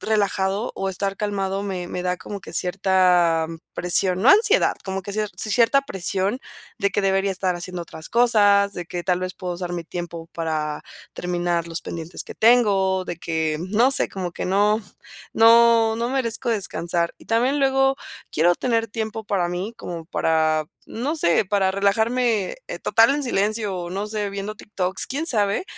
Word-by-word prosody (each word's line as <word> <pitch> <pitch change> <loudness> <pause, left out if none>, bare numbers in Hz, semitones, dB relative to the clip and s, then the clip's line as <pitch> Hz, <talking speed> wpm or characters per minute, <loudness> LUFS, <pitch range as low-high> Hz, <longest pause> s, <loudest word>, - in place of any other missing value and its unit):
relajado 200 0 0
o 195 - -2
estar 195 +1 -3
calmado 195 -1 -2
me 185 -3 -4
me 180 - -4
da 180 0 -1
como 200 +1 -7
que - - -11
cierta, 180 -3 +2 0.3
presión 180 +1 +2
no 235 - +4
ansiedad, 430 +5 +5
como 190 0 -3
que 200 - -6
cie 215 0 -1
cierta 230 +5 +3
presión 195 0 -2 0.4
de 200 - +1
que - - 0
debería 195 0 +1
estar 185 -1 -1
haciendo 175 0 -5
otras 160 -1 -10
cosas, 205 -4 +4
de 175 - -5
que 175 0 -5
tal 180 -1 +1
vez, 185 0 -3
puedo 180 -2 -5
usar 175 0 -5
mi 175 - -3
tiempo 170 -1 -7
para, 155 -2 -3 0.3
terminar 175 -1 -2
los 165 0 -4
pendientes 165 +1 -6
que - - -9
tengo, 200 -5 +3
de 175 - -4
que, 160 -2 -2
no 235 +5 +4
sé, - - +4
como 180 -3 -5
que - - -5
no 205 +3 +2 0.5
no 230 0 +5
no 235 +1 -2
merezco 250 -2 -1
descansar. 170 -5 -1
Y - - -18
también 250 +5 +1
luego 270 0 +3 0.3
quiero 175 +3 +3
tener 230 -3 0
tiempo 220 +1 -4
para 195 -4 0
mí, 185 +6 -4
como 170 -6 -7
para, 155 -2 +1 0.2
no 280 +8 -3
sé, 170 - +2
para 195 -1 +1
relajarme 220 +2 +1
eh, - - -5
total 230 +5 +4
en 290 - -2
silencio 215 -3 -1
o 175 -1 -5
no 195 +3 -3
sé, 210 -1 -3
viendo 200 +1 -5
TikToks, 190 -3 -3
quién 285 +5 -3
sabe, 210 - +1
195 Hz, 175 wpm, -22 LUFS, 180-225 Hz, 0.5 s, ansiedad